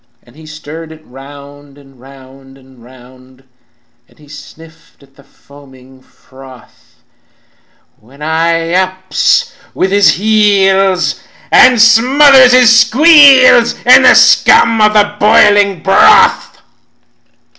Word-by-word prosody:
"And 120 - -26
he 155 0 -18
stirred 155 +1 -13
it 155 0 -19
round 140 +1 -18
and 135 -2 -24
round 135 0 -20
and 130 -3 -24
round, 130 +1 -22 0.7
And - - -30
he 150 - -23
sniffed 160 +1 -19
at 135 0 -28
the 140 - -23
foaming 135 -2 -22
froth; 130 -1 -22 1.0
When 135 +7 -19
I 165 +1 -4
ups 185 0 -4 0.2
with 190 - -4
his 200 0 0
heels, 195 -3 -2 0.3
and 250 -2 +2
smothers 255 +3 +2
his 240 -2 +2
squeals 265 -1 +2
In - - +4
the - - +2
scum 225 -1 +1
of 215 0 0
the 205 -1 -2
boiling 205 -3 0
broth. 310 - 0
165 Hz, 115 wpm, -8 LUFS, 135-210 Hz, 1.0 s, In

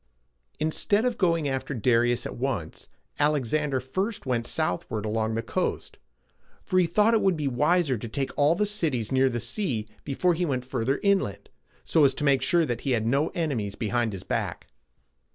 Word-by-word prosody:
Instead 205 +8 +1
of 250 -2 +1
going 165 -5 +1
after 135 +1 -3
Darius 120 +1 +2
at - - -5
once, 120 - -4 0.3
Alexander 145 -1 +1
first 190 - -3
went 120 -2 -1
southward 105 +4 -2
along 110 +1 -1
the 115 - -2
coast; - - -3 0.6
for 185 - +1
he 175 - +3
thought 210 +7 +3
it 220 - +3
would 190 -4 +2
be 150 -2 -1
wiser 150 - +2
to 115 - -6
take 135 +3 -2
all 150 +3 +3
the 210 - +1
cities 160 - -1
near 130 0 +3
the 120 -1 -2
sea 125 - -1 0.2
before 175 +6 +1
he 175 +2 -1
went 130 -6 -1
farther 130 +1 -1
inland, 200 - 0 0.3
so 160 - +3
as 135 -2 +4
to - - -4
make 140 -2 +3
sure 170 +4 +3
that 120 -5 -3
he 135 - 0
had 110 -2 0
no 140 +7 +2
enemies 125 - -2
behind 115 +1 -1
his 95 -2 -7
back. - - -3
135 Hz, 185 wpm, -26 LUFS, 120-170 Hz, 0.6 s, as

